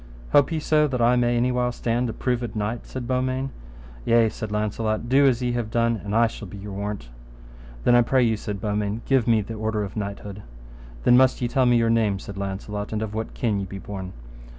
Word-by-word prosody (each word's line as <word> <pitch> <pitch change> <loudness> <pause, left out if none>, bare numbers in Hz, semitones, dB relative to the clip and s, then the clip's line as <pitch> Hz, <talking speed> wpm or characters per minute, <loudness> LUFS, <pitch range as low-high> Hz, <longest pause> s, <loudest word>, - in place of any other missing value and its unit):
Hope 145 0 +5
ye 160 - 0
so 150 0 +3
that 130 -3 -2
I 120 +1 +4
may 120 -1 +2
any 125 +2 +2
while 125 0 0
stand 120 0 -1
a - - -3
proved 120 -3 -2
knight? 110 +2 -3
said 130 -2 -6
Beaumains. 130 +1 -1 0.5
Yea, 115 - +4
said 110 -1 -6
Launcelot, 110 +1 -1
do 135 +3 +5
as 125 -1 +1
ye 125 - 0
have 120 -2 -2
done, 115 0 +1
and 105 +1 -3
I 115 +1 +5
shall 110 -2 -5
be 95 - -9
your 100 +1 -8
warrant. 100 -9 -5 0.7
Then, - - +4
I 120 - +7
pray 130 +2 +3
you, 115 -2 +2
said 105 -1 -5
Beaumains, 105 +1 -2
give 135 -4 +2
me 115 -2 +4
the 105 +3 -6
order 110 -1 -2
of 100 - -7
knighthood. 100 -1 -5 0.6
Then 125 - +6
must 130 0 +4
ye 125 - 0
tell 130 +1 +2
me 120 -1 +5
your 115 -1 +2
name, 110 -4 +2
said 100 +1 -9
Launcelot, 100 +1 -4
and 110 0 -1
of 110 -1 -5
what 110 +1 -4
kin 110 -4 0
ye 100 - -3
be 95 - -7
born. 95 -1 -7
115 Hz, 230 wpm, -24 LUFS, 105-125 Hz, 0.7 s, I